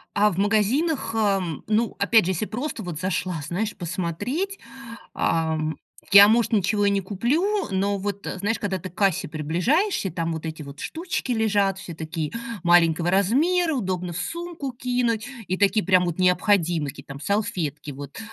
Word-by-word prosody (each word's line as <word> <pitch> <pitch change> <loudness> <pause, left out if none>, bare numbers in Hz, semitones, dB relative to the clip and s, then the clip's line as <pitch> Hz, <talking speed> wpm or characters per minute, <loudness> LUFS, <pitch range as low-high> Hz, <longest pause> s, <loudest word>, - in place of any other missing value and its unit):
А 210 +1 +4
в 180 - -6
магазинах, 225 +6 +1
эм, 195 -7 0
ну, 220 +1 +1
опять 220 0 +4
же, 185 - +1
если 190 +4 -1
просто 240 -1 -4
вот 170 -3 -5
зашла, 180 -2 -2
знаешь, 210 +5 -2
посмотреть. 195 - -3 0.5
Ам, 160 -1 0 0.4
я, 200 +1 +10
может, 230 +1 +2
ничего 205 0 +2
и - - +4
не 200 0 +1
куплю, 295 - 0
но 200 +1 0
вот, 200 0 -4
знаешь, 205 +4 0
когда 190 -2 -2
ты 185 - -7
к 180 - -24
кассе 195 -4 +1
приближаешься, 185 - 0
там 165 -1 -2
вот 160 0 -5
эти 160 -1 -5
вот 140 +1 -11
штучки 335 -6 -3
лежат, 205 -3 +1
все 185 -3 -8
такие 160 -1 -4 0.3
маленького 175 0 +4
размера, 310 - +2
удобно 185 -6 -2
в - - -5
сумку 335 - -4
кинуть, 245 -2 -1 0.2
и 185 +1 -1
такие 205 +1 +2
прям 185 -2 +4
вот 175 -2 -3
необходимые 180 -4 +2
какие-то 135 +1 -12
там: 140 - -10
салфетки 175 -6 -2
вот, 140 0 -9
195 Hz, 165 wpm, -24 LUFS, 170-225 Hz, 0.5 s, я